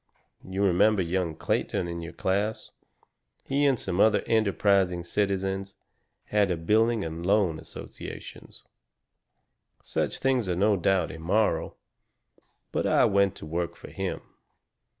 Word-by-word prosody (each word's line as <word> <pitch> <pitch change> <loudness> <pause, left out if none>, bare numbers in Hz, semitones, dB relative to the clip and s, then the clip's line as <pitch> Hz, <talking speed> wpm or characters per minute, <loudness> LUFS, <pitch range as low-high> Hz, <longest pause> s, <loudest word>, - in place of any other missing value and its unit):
You 95 +2 -2
remember 100 +2 +3
young 85 -1 -1
Clayton 85 - -1
in 85 -1 -5
our 85 - -7
class? 100 +3 -2 0.7
He 140 +1 +2
and 135 -4 +2
some 90 -1 -3
other 110 +1 +4
enterprising 100 -4 +2
citizens 95 0 -2 0.5
had 105 -2 +1
a 90 - 0
building 110 +5 +2
and 80 +1 -5
loan 95 -4 +2
association. - - -9 1.3
Such - - -2
things 130 -6 +1
are 90 - 0
no 100 +3 +3
doubt 95 -1 +1
immoral, 90 +7 0 0.9
but - - 0
I - - +4
went 100 -1 +2
to - - -9
work 85 +2 -3
for - - -12
him. - - -4
95 Hz, 130 wpm, -27 LUFS, 85-105 Hz, 1.3 s, other